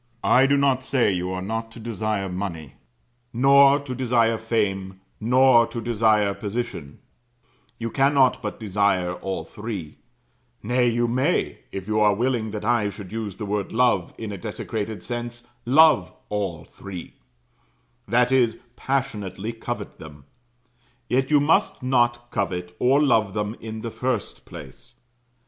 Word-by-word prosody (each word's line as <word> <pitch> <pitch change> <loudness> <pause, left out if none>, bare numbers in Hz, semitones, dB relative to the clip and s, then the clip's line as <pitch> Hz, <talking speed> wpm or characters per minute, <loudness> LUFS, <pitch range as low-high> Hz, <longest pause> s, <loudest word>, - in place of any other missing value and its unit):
I 130 +2 +5
do 140 +1 +3
not 135 -2 +2
say 130 -5 +2
you 90 -1 -2
are 105 +5 -3
to 115 - -13
desire 110 -3 -2
money, 90 -6 -5 0.6
nor 140 +3 +6
to 140 -3 -6
desire 115 -3 +1
fame, 95 -4 -2 0.2
nor 120 +1 +5
to 115 0 -6
desire 110 -3 +2
position; 105 -9 -5 0.8
you 115 -1 -4
cannot 135 0 +3
but 105 -3 -5
desire 100 -4 +1
all 95 +1 -4
three; 105 -8 -7 0.6
nay, 120 +2 +2
you 120 +1 +1
may 125 +3 0
if 95 0 -6
you 110 0 +1
are 105 -1 +4
willing 120 -1 0
that 105 -1 -5
I 115 -3 +2
should 100 -1 -10
use 110 -3 -5
the 110 - -5
word 100 -1 -2
Love 115 -7 +1
in 110 -2 -5
a 100 - -6
desecrated 110 0 -5
sense 120 0 -5 0.2
love 140 - +5 0.2
all 95 -7 -3
three; 95 -4 -9 0.9
that 125 +3 +2
is, 120 -4 +3 0.2
passionately 115 -6 -3
covet 115 - -6
them, 75 -3 -12 0.9
yet 130 +1 +1
you 150 -1 +5
must 145 -2 +1
not 120 -2 +1
covet 90 -4 -3
or 135 +3 +4
love 110 -8 +2
them 105 +1 -2
in 110 0 -7
the 115 - -5
first 125 -3 -3
place. 65 -3 -12
115 Hz, 145 wpm, -24 LUFS, 100-125 Hz, 0.9 s, nor